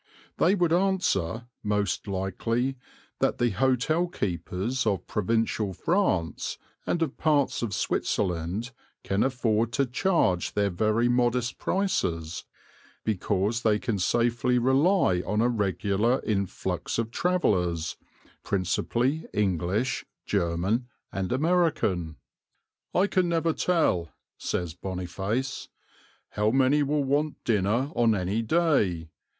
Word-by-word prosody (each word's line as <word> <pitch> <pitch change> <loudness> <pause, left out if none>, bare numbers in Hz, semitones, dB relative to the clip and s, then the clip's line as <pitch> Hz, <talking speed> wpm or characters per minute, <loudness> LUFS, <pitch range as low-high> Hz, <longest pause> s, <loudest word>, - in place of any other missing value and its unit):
They 185 +4 +4
would 175 -4 +2
answer, 150 - +1 0.2
most 105 -2 -1
likely, 115 +7 -1 0.4
that - - +1
the 120 -1 +2
hotel 135 - +1
keepers 100 - -2
of 95 -4 0
provincial 110 -1 0
France 95 - 0 0.3
and 170 - +1
of 150 -4 -4
parts 145 -4 +2
of 115 -3 -2
Switzerland 95 +4 -1 0.3
can 100 +1 0
afford 115 -4 +1
to 140 0 +2
charge 125 - +1
their 100 -1 +1
very 110 +6 +2
modest 120 0 +1
prices 85 - -1 0.6
because 105 +2 0
they 110 -2 +3
can 110 -3 -2
safely 120 +5 +2
rely 130 - +3
on 105 +2 -1
a 115 - +4
regular 105 +1 +1
influx 100 -4 -2
of 115 0 -1
travellers, 90 - 0 0.5
principally 120 - 0
English, 100 +5 0 0.2
German, 95 +6 0 0.2
and 95 -1 -3
American. 130 - +1 0.8
"I 185 - +4
can 185 -3 +1
never 165 -1 +1
tell," 155 - +1 0.3
says 85 -3 -2
Boniface, 95 +8 -3 0.6
"how 105 +1 +1
many 135 +4 +3
will 145 +1 +1
want 145 +3 0
dinner 115 +6 +1
on 115 -2 +3
any 95 +4 -1
day. 110 - +1
115 Hz, 110 wpm, -27 LUFS, 95-135 Hz, 0.8 s, They